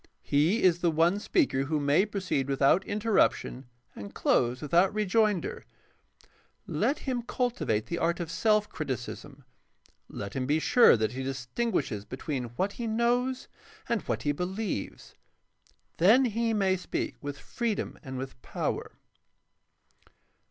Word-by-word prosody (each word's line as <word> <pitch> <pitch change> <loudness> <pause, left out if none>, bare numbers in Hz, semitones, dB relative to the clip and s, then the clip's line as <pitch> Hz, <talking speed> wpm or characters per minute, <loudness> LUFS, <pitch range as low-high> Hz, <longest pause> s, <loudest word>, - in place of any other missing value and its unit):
He 155 +10 +2
is 175 -2 +4
the 175 - +2
one 165 +5 +2
speaker 210 - +1
who 155 +1 0
may 145 +8 +3
proceed 185 -10 -2
without 140 +6 +3
interruption 205 - +1 0.3
and 100 0 -9
close 125 +1 +2
without 170 +6 +3
rejoinder. 215 - +1 1.0
Let 290 - 0
him 255 -3 -3
cultivate 235 - -1
the 170 - -3
art 170 +2 0
of 165 -2 -4
self 210 +4 +2
criticism. 140 -1 -6 0.6
Let 100 0 -7
him 130 -1 -2
be 150 +2 +3
sure 195 - +6
that 110 0 0
he 130 +1 -5
distinguishes 130 - -2
between 130 +2 -4
what 195 +2 0
he 235 +2 -5
knows 245 +3 0 0.4
and 235 -4 0
what - - -3
he 145 - +1
believes. 180 - -4 0.8
Then 225 +10 +6
he 230 0 0
may 195 -3 +2
speak 180 - -4
with 145 -1 -5
freedom 230 - -3
and 130 -3 -7
with 130 -1 -7
power. - - -3
175 Hz, 135 wpm, -28 LUFS, 135-220 Hz, 1.0 s, sure